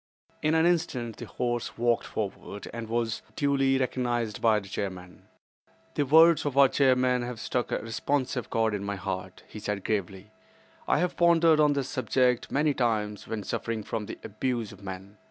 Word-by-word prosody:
In 155 +1 +2
an 160 +1 +4
instant 140 -10 0
the - - -7
horse 120 -1 -3
walked 120 0 +1
forward, 100 -1 -5
and 115 -1 -6
was 115 -1 -1
duly 135 -2 +2
recognized 120 -4 -1
by 110 -2 +4
the 100 - -12
chairman. 95 -2 -6 0.7
"The 145 - 0
words 160 +3 +6
of 145 -2 -3
our 140 -1 +8
chairman 130 -2 +3
have 120 -1 -5
struck 120 +1 -2
a - - +1
responsive 125 +3 -2
chord 110 -1 +1
in 100 -1 -3
my 100 0 -3
heart," 95 -1 -5
he 110 - -9
said 105 -2 -3
gravely. 100 -1 -3 0.6
"I - - +3
have 180 0 0
pondered 165 -2 +5
on 150 -1 +5
this 140 -2 -2
subject 125 -1 +1
many 150 +1 +2
times 110 -5 -1
when 110 -2 -4
suffering 110 +3 -3
from 105 0 -4
the - - -7
abuse 115 +1 -2
of 100 -1 -14
men. 95 +1 -8
120 Hz, 175 wpm, -28 LUFS, 105-135 Hz, 0.7 s, our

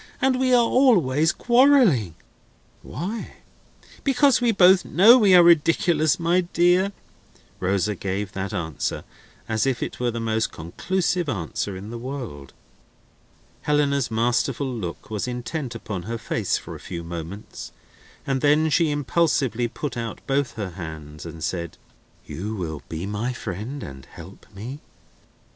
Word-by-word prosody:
And 260 -1 +2
we 260 -1 +2
are 240 -2 +5
always 170 - +3
quarrelling." 240 - +4 0.7
"Why?" 205 +8 -6 0.7
"Because 275 -1 +3
we 240 -1 +3
both 190 -2 +6
know 215 +7 +7
we 200 -5 +6
are 175 - +8
ridiculous, 165 -1 +3
my 170 +2 +2
dear!" 175 +2 +2 0.7
Rosa 95 +2 0
gave 95 +1 -4
that 95 +2 -4
answer 85 -7 -3 0.4
as 110 +3 0
if 130 -3 0
it - - -6
were 125 -1 0
the 115 0 -4
most 110 -1 -1
conclusive 175 - -2
answer 95 - -3
in 100 +4 -8
the 120 - -6
world. 120 - -7 1.1
Helena's 140 -3 +1
masterful 120 +4 0
look 95 -3 -6
was 105 +2 -2
intent 125 +1 -4
upon 105 -5 -5
her 115 - -2
face 110 -3 -1
for - - -9
a - - -9
few 85 -1 -7
moments, 85 +4 -8 0.5
and 135 -1 -1
then 150 +2 +3
she 165 0 +3
impulsively 145 -5 +1
put 135 +3 -5
out 115 -2 -5
both 140 -1 0
her 100 -4 -5
hands 80 -3 -8
and 80 -1 -8
said: 85 -2 -4 0.5
"You 105 +5 -5
will 80 -6 -5
be 80 +3 -4
my 105 +5 -3
friend 115 +6 -6
and 65 -1 -9
help 90 +4 -13
me?" 120 +8 -7
125 Hz, 145 wpm, -23 LUFS, -, 1.1 s, are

